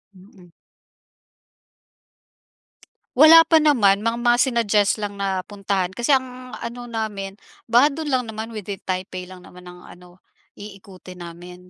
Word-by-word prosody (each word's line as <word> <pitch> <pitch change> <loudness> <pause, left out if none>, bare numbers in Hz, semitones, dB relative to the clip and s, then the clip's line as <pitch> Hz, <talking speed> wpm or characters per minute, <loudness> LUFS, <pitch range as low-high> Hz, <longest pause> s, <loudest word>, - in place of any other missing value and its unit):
Mm. 185 -1 -19 2.7
Wala 320 +4 +8
pa 320 -2 +4
naman, 210 -9 +3
mang 230 +1 -1
mga 240 0 +2
sinuggest 220 -5 +1
lang 205 -1 -5
na 195 -1 -2
puntahan, 195 -2 -3
kasi 240 +4 -1
ang 255 -1 -1
ano 240 +1 -7
namin, 205 -3 -5 0.3
baka 245 +5 +5
dun 310 0 -5
lang 255 -1 +1
naman, 220 +1 -7
within 205 -2 -7
Taipei 185 0 -5
lang 180 -1 -13
naman 180 0 -15
ang 180 0 -13
ano, 180 0 -16 0.4
iikutin 190 -3 -12
namin, 180 +1 -12
205 Hz, 135 wpm, -21 LUFS, 185-240 Hz, 2.7 s, Wala